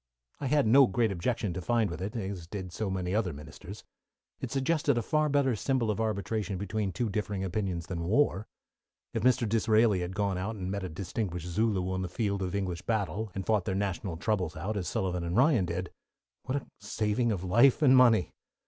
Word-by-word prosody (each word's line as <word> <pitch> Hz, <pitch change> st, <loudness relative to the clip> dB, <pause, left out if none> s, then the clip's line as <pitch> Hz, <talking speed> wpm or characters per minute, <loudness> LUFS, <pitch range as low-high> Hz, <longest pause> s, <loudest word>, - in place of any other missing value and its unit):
I 140 Hz, -, -2 dB
had 145 Hz, 0 st, +3 dB
no 130 Hz, +4 st, +7 dB
great 115 Hz, +1 st, +1 dB
objection 95 Hz, +1 st, -1 dB
to 90 Hz, -, -4 dB
find 115 Hz, +3 st, +1 dB
with 85 Hz, -, -6 dB
it, 105 Hz, +5 st, -4 dB
as 95 Hz, -6 st, -4 dB
did 95 Hz, -1 st, -6 dB
so 105 Hz, +3 st, -3 dB
many 95 Hz, -1 st, -2 dB
other 105 Hz, -4 st, +1 dB
ministers. 75 Hz, +1 st, -10 dB, 0.6 s
It 130 Hz, -, -4 dB
suggested 140 Hz, +1 st, +1 dB
a 120 Hz, -, 0 dB
far 155 Hz, +5 st, +1 dB
better 140 Hz, -4 st, +2 dB
symbol 120 Hz, 0 st, 0 dB
of 105 Hz, -, -2 dB
arbitration 105 Hz, -1 st, -2 dB
between 100 Hz, +1 st, -2 dB
two 120 Hz, +4 st, -1 dB
differing 105 Hz, -1 st, -2 dB
opinions 95 Hz, -2 st, -2 dB
than 85 Hz, -3 st, -4 dB
war. 110 Hz, -1 st, +2 dB, 0.7 s
If -, -, -1 dB
Mr. 125 Hz, -2 st, +3 dB
Disraeli 110 Hz, -1 st, +3 dB
had 90 Hz, +1 st, -4 dB
gone 100 Hz, -3 st, 0 dB
out 105 Hz, +4 st, -3 dB
and 95 Hz, -2 st, -4 dB
met 100 Hz, -1 st, -3 dB
a 95 Hz, -, -4 dB
distinguished 90 Hz, 0 st, -4 dB
Zulu 95 Hz, 0 st, 0 dB
on 95 Hz, 0 st, -1 dB
the 90 Hz, -, -3 dB
field 100 Hz, 0 st, -1 dB
of 95 Hz, 0 st, -2 dB
English 90 Hz, -4 st, -2 dB
battle, 110 Hz, -1 st, -2 dB
and 95 Hz, -1 st, -3 dB
fought 105 Hz, -4 st, +1 dB
their 95 Hz, -, -1 dB
national 95 Hz, -3 st, -2 dB
troubles 95 Hz, -3 st, -1 dB
out, 95 Hz, +7 st, -3 dB
as 95 Hz, -4 st, -2 dB
Sullivan 90 Hz, -2 st, -1 dB
and 85 Hz, +4 st, -2 dB
Ryan 125 Hz, -, +4 dB
did, 90 Hz, +1 st, -4 dB, 0.5 s
what 130 Hz, -, -2 dB
a 145 Hz, -, -3 dB
saving 105 Hz, +3 st, 0 dB
of 95 Hz, -4 st, -2 dB
life 120 Hz, -, +4 dB
and 130 Hz, -2 st, +7 dB
money! 120 Hz, -7 st, +5 dB
100 Hz, 205 wpm, -29 LUFS, 90-115 Hz, 0.7 s, no